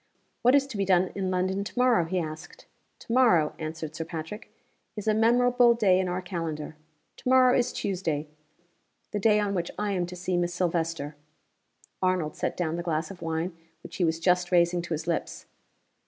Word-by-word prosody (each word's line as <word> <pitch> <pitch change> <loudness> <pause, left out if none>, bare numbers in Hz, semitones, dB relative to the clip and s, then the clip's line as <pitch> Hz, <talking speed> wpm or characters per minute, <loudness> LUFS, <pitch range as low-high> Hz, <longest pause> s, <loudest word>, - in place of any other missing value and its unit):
"What 250 +3 +5
is 280 -1 +4
to 265 -6 -7
be 200 - +1
done 185 -1 +3
in 190 -2 -2
London 185 +2 0
to 205 - -9
morrow?" 250 -8 +4
he 185 +3 -2
asked. 155 -2 -6 0.4
"To 230 - -5
morrow," 185 -12 +4
answered 155 -1 -5
Sir 165 - -3
Patrick, 165 +6 -7 0.4
"is 210 -1 -6
a 215 - +4
memorable 240 +2 +4
day 195 -5 +3
in 190 - 0
our 180 +1 -3
calendar. 165 -4 -4 0.4
To - - -4
morrow 255 -1 +6
is 245 0 +1
Tuesday 165 -6 -2 0.8
the 205 - -2
day 210 +1 +4
on 205 -1 0
which 175 -3 -2
I 210 -1 -1
am 180 -3 -1
to 180 - -8
see 180 0 -2
Miss 175 0 -1
Silvester." 165 -4 -1 0.9
Arnold 185 -5 0
set - - -3
down 170 -2 -1
the - - -2
glass 160 -1 -2
of 190 - -11
wine 165 +2 -2 0.3
which - - -9
he 185 - +1
was 165 -1 +1
just 180 +1 +2
raising 175 0 +3
to 170 -1 -3
his 155 - -6
lips. 170 -1 -3
180 Hz, 195 wpm, -27 LUFS, 165-205 Hz, 0.9 s, morrow